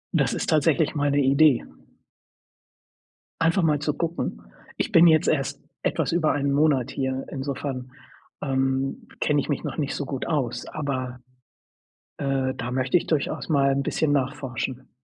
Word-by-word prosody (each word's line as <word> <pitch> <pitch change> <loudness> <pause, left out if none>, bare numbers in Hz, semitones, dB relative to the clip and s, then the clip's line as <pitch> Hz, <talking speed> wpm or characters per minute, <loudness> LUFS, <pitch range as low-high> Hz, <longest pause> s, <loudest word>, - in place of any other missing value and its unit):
Das - - +3
ist - - -3
tatsächlich 155 0 +3
mal 145 -2 +1
'ne 145 +1 +2
Idee. 140 0 +4 1.8
Einfach 165 +3 +3
mal 150 -3 +3
zu 150 +1 -1
gucken. 165 - -3 0.4
Ich - - -1
bin 170 +1 +7
jetzt 155 -1 +4
erst 135 -4 0 0.2
etwas - - 0
über 165 -2 +2
1 140 -1 0
Monat 140 -4 +2
hier, 130 -1 -2
insofern, 135 -2 -4 0.5
ähm, 135 -1 -1
kenne 145 -1 +2
ich 140 - -3
mich 145 - -1
noch - - -4
nicht 145 -3 -1
so 145 - -3
gut 135 -1 -4
aus, 135 -7 -1
aber, 130 -4 -4 1.0
äh, 135 -2 0
da 125 0 -4
möchte 130 +5 +2
ich - - -3
durchaus 155 +1 -1
mal 140 -2 +3
'n 140 0 0
bisschen 150 +2 0
nachforschen. 130 -2 -2
140 Hz, 155 wpm, -25 LUFS, 130-150 Hz, 1.8 s, bin